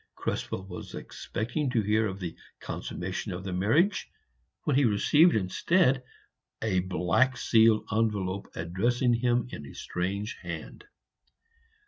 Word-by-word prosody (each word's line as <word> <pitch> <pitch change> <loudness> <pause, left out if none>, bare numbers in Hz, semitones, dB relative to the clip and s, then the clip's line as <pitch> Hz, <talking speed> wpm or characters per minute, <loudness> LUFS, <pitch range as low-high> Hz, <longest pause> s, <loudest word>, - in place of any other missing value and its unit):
Krespel 95 - -3
was 90 - -8
expecting 125 +6 -3
to 115 -3 +1
hear 110 +2 +2
of 95 -1 -5
the 85 -3 -5 0.2
consummation 95 +3 -4
of 90 +1 -5
the 95 -1 -4
marriage, 145 - +2 0.5
when 145 - +1
he 140 - +4
received 145 - +5
instead 130 - +2 0.6
a 100 -4 +1
black 95 +8 +1
sealed 115 -2 +4
envelope 100 -3 0
addressed 95 +10 -1
in 120 -1 +3 0.4
a 70 - -10
strange 100 +4 -3
hand. 85 - -7
105 Hz, 120 wpm, -28 LUFS, 95-125 Hz, 0.6 s, received